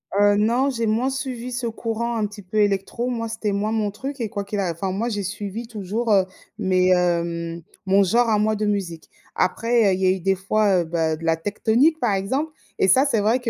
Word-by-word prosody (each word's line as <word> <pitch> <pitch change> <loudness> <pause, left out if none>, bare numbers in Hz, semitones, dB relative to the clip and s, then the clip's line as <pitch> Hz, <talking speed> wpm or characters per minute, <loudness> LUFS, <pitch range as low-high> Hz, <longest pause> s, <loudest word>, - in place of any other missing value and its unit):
Heu, 205 0 +5
non, 235 +6 +2
j'ai 230 -4 -2
moins 230 +5 +1
suivi 255 -2 -4
ce 245 -1 -2
courant 230 +1 -3
un 215 - 0
petit 205 0 -11
peu 190 +3 -5
électro, 205 +4 0
moi 230 -2 -2
c'était 220 -2 -2
moins 205 +2 -1
mon 215 -2 0
truc 270 +5 -6
et 225 - -2
quoi 200 -1 -4
qu'il 205 +1 -3
a 185 -3 0
enfin, 185 +3 -3
moi 215 +6 -1
j'ai 210 -3 -2
suivi 205 +4 -5
toujours, 220 +1 -3
heu, 190 -2 +4 0.3
mes, 185 -1 +2
hem, 170 -1 0 0.2
mon 195 +1 +4
genre 230 +5 +2
à 215 -1 +3
moi 215 +1 +2
de 215 0 -1
musique. 190 -6 -3 0.3
Après, 230 +5 +1
il - - +5
y - - +4
a - - +4
il 185 - 0
y - - +2
a - - +5
eu - - -9
des 195 +2 +2
fois, 195 0 +2
heu, - - -9
bah, 160 -1 -1
de 165 - -8
la 165 0 +3
Tecktonik, 225 - +1
par 210 - +1
exemple, 260 +11 -1 0.3
et - - +4
ça 260 +9 +5
c'est 255 -6 +1
vrai 220 +5 +2
que, 245 -2 -3
210 Hz, 250 wpm, -22 LUFS, 190-230 Hz, 0.3 s, Heu